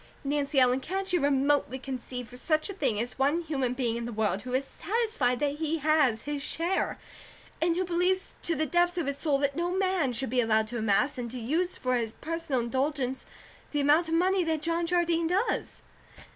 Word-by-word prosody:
Nancy 285 0 +1
Ellen, 255 0 +4
can't 380 +6 -3
you 355 - +4
remotely 280 -1 +2
conceive 250 -3 -6
of 250 - -9
such 310 +6 0
a - - -7
thing 270 - 0
as 245 +3 -4
one 290 +5 +2
human 270 -6 -1
being 240 -3 -1
in 235 - -4
the 240 - -4
world 210 -3 0
who 250 +2 -3
is 270 +1 0
SATISFIED 400 - 0
THAT 290 -1 0
HE 320 +1 -1
HAS 295 -7 +2
HIS 290 -1 -3
SHARE, 335 +6 -1 0.6
and 335 0 +2
who 370 +1 0
believes 360 +2 0
to 335 - 0
the 315 - 0
depths 350 +3 +2
of 345 - 0
his 280 0 -3
soul 295 -4 +2
that 280 0 0
no 345 +2 -1
man 370 -6 +1
should 245 0 -2
be 250 -1 +3
allowed 220 -1 +2
to 240 0 -3
amass, 220 +5 +1
and 240 -1 -4
to 250 +2 -5
use 325 +10 -1
for 255 -1 0
his 225 -2 -2
personal 330 -4 -2
indulgence, 265 +1 -1 0.5
the 295 - +1
amount 300 +4 +4
of 325 - 0
money 370 +2 +3
that 320 -2 -1
John 335 +1 0
Jardine 340 -1 +2
does?" 380 +7 -1
290 Hz, 210 wpm, -28 LUFS, 255-340 Hz, 0.6 s, Ellen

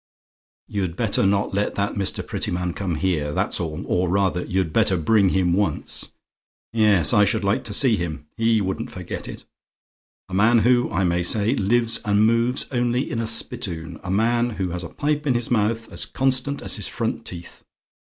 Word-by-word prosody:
"You'd 95 -5 -3
better 100 -2 +1
not 100 +1 0
let 100 +1 -1
that 100 +1 -1
Mr. 100 -2 -2
Prettyman 90 0 -2
come 95 -3 -3
here, 80 -4 -1
that's - - -1
all; 80 -3 -4
or, 90 0 0
rather, 95 -1 +1
you'd 95 -3 -2
better 105 -4 +3
bring 100 +4 +3
him 90 -2 +1
once. 100 +2 -1 0.6
Yes, 105 -8 +3
I 105 -2 +5
should 105 +2 0
like 100 0 0
to 105 - -4
see 120 -4 +4
him. 80 -3 -5
He 115 -1 +2
wouldn't 95 -1 -3
forget - - -7
it. - - -9 0.8
A 95 - -12
man 110 +5 +4
who, 125 0 +3
I 95 - -1
may 90 -1 +1
say, 105 +6 +2
lives 115 0 +2
and 105 +1 +3
moves 115 +3 +2
only 125 +1 0
in 115 - -2
a 115 - -1
spittoon. 85 -6 0
A 95 - -6
man 115 +5 +1
who 95 -5 -3
has 90 +1 -4
a 85 - -7
pipe 150 0 -2
in 130 - +2
his 120 0 -2
mouth 115 0 0
as - - -3
constant 135 +1 -1
as - - 0
his - - -4
front - - -3
teeth. 85 -1 -8
100 Hz, 190 wpm, -22 LUFS, 90-115 Hz, 0.8 s, I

